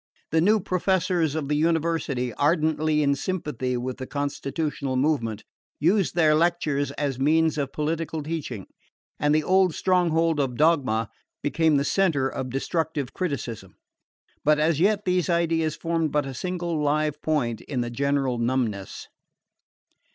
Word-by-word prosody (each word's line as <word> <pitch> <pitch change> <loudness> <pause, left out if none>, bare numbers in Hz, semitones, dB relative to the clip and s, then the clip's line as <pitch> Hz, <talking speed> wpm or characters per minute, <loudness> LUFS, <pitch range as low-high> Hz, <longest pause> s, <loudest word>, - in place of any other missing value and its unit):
The 160 +1 +3
new 210 +5 +4
professors 180 -4 0
of 155 -3 -2
the 150 - 0
University, 160 -6 0
ardently 155 +1 +1
in 140 -1 +3
sympathy 140 -6 -2
with 125 +1 -4
the 130 -1 -6
constitutional 140 -1 -3
movement, 130 -6 0 0.4
used 185 +4 +2
their 160 -3 +4
lectures 155 -3 +1
as 140 -3 -2
means 160 +3 +3
of 140 -2 -2
political 160 +1 -2
teaching, 145 - -5 0.5
and 150 +1 +2
the 155 - +2
old 185 0 +3
stronghold 165 -3 +2
of 130 -4 -1
dogma 135 -9 +2 0.3
became 155 +2 +2
the 140 - +1
centre 160 -9 +2
of 130 -1 -4
destructive 145 +1 -2
criticism. 120 - -4 0.7
But 150 +1 +4
as 155 0 +2
yet 205 +3 +2
these 180 0 +1
ideas 165 -2 +1
formed 165 -2 -1
but 150 -1 +1
a 135 - -5
single 175 +1 -3
live 150 0 0
point 120 -8 -1
in 130 -4 -3
the 120 0 -3
general 135 -1 0
numbness. 115 -5 -2
150 Hz, 145 wpm, -25 LUFS, 135-165 Hz, 0.7 s, new